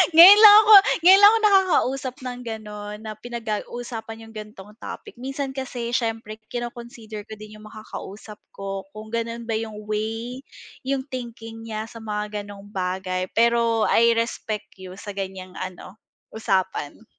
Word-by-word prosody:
Ngayon 380 +5 +11
lang 420 -1 +10
ako 430 +1 +6 0.3
ngayon 380 +3 +8
lang 410 +1 +9
ako 455 - +2
nakakausap 340 -11 +2
ng 250 -1 -5
gano'n 210 -2 -7
na 215 - -6
pinag 235 0 -7
ga 215 -2 -1 0.2
usapan 225 -2 -7
yung - - -14
ganitong 210 -1 -10
topic. 240 - -9
Minsan 270 +1 -4
kasi 250 -3 -5
siyempre 225 -3 -3
kino-consider 235 -3 -7
ko - - -9
din 215 0 -12
yung 215 - -13
makakausap 215 -1 -10 0.2
ko 195 0 -6
kung 215 0 -10
gano'n 230 0 -3
ba 225 -1 -3
yung 215 -2 -7
way, 225 +4 -4 0.5
yung 270 -1 -1
thinking 230 -2 -8
niya 215 -1 -4
sa 230 - -10
mga 210 -1 -4
gano'ng 205 0 -12
bagay, 185 -1 -3
pero 230 -1 +3
I 235 0 +4
respect 230 -2 -3
you 185 -1 -10
sa 205 +1 -8
ganyang 190 -2 -6
ano, 185 +2 -8 0.3
usapan. 190 -5 -2
225 Hz, 155 wpm, -23 LUFS, 210-240 Hz, 0.5 s, Ngayon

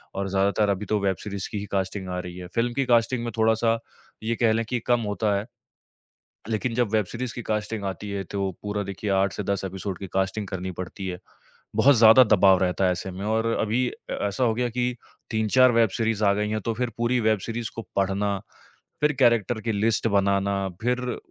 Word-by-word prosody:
और 100 0 -2
ज़्यादातर 100 +2 +2
अभी 100 +1 -1
तो 105 -1 0
वेब 95 -1 +1
सीरीज़ 100 -2 -5
की 105 - -3
ही 100 - -5
कास्टिंग 95 -1 -2
आ 90 0 -3
रही 90 0 -7
है। 90 - -7
फ़िल्म 120 +1 +1
की 135 0 0
कास्टिंग 120 0 +2
में 120 - -3
थोड़ा-सा 110 +1 +3 0.5
ये 115 +1 0
कह 115 -2 +3
लें 115 0 0
कि 125 - 0
कम 120 -1 +3
होता 105 0 0
है। 100 - -3 1.0
लेकिन 115 +2 -1
जब 120 -3 +1
वेब 105 -3 +3
सीरीज़ 120 +4 -5
की 120 - -4
कास्टिंग 105 0 -2
आती 95 +2 -5
है 100 -1 -3
तो 100 -1 -1
पूरा 105 0 -2
देखिए 100 +2 -5
8 95 -1 0
से 105 - -4
10 100 - -1
एपिसोड 95 0 -4
की 95 - -6
कास्टिंग 95 +2 -1
करनी 95 -1 -4
पड़ती 95 +1 -6
है। 90 -1 -4 0.6
बहुत 130 +5 +6
ज़्यादा 115 +3 +8
दबाव 95 -2 +6
रहता 90 +1 +1
है 90 - +3
ऐसे 90 +1 -4
में। 95 +3 -6
और 110 +1 +1
अभी 120 +4 +1
अ, - - -10 0.2
ऐसा 100 +5 -1
हो 115 - +3
गया 120 0 0
कि 125 +1 -1 0.4
3-4 115 +4 +4
वेब 115 -2 +4
सीरीज़ 110 -2 0
आ 100 - +5
गई 105 +1 -1
हैं, 110 -1 -2
तो 115 - -2
फिर 125 +1 -1
पूरी 120 +1 +1
वेब 110 -2 +2
सीरीज़ 115 0 -3
को 115 - -4 0.2
पढ़ना, 100 +1 0 0.6
फिर 150 0 +3
कैरेक्टर 115 -2 +3
की 115 - -1
लिस्ट 110 +2 +1
बनाना, 100 -1 +1 0.2
फिर 125 +1 -1
105 Hz, 215 wpm, -25 LUFS, 100-115 Hz, 1.0 s, ज़्यादा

